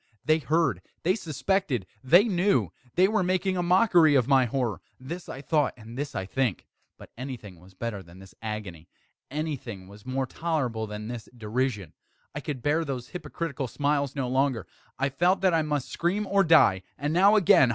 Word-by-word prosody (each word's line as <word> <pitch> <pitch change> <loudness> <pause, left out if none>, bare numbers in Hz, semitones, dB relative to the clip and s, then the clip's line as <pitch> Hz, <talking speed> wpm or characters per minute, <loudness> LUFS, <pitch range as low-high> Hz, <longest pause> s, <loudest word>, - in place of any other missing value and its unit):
They 155 +1 +4
heard! 150 - +1 0.2
they 180 - +3
suspected! 170 - -1 0.2
they 170 +9 +7
knew! 180 - +1 0.2
they 185 +2 +5
were 215 0 +1
making 185 +1 0
a 180 - 0
mockery 175 -4 +5
of 130 -3 +3
my 135 -2 +5
horror! 120 - -2 0.2
this 170 +8 -7
I 135 - -7
thought, 150 -1 +1
and 115 +1 -11
this 145 +2 -4
I 95 - -2
think. 120 0 -1 0.3
But - - -14
anything 120 -9 -7
was 95 +2 -18
better 105 -1 -4
than 85 0 -15
this 95 0 -14
agony! 105 -7 -6 0.4
Anything 135 -10 -5
was 100 +1 -14
more 130 +1 -1
tolerable 130 -8 -2
than 105 0 -6
this 120 -2 -7
derision! 110 - -2 0.4
I - - -4
could 135 -5 -5
bear 155 +3 +2
those 130 -5 -5
hypocritical 165 -6 -4
smiles 140 +2 0
no 135 -3 -1
longer! 130 -4 +1 0.3
I 140 +1 +1
felt 175 +8 +2
that 190 -2 +3
I 165 - +3
must 150 -3 -2
scream 190 +5 0
or 195 0 +3
die! 155 - +5 0.2
and 145 +2 -2
now 195 +5 +6
again! 160 - +6
135 Hz, 185 wpm, -27 LUFS, 115-170 Hz, 0.4 s, they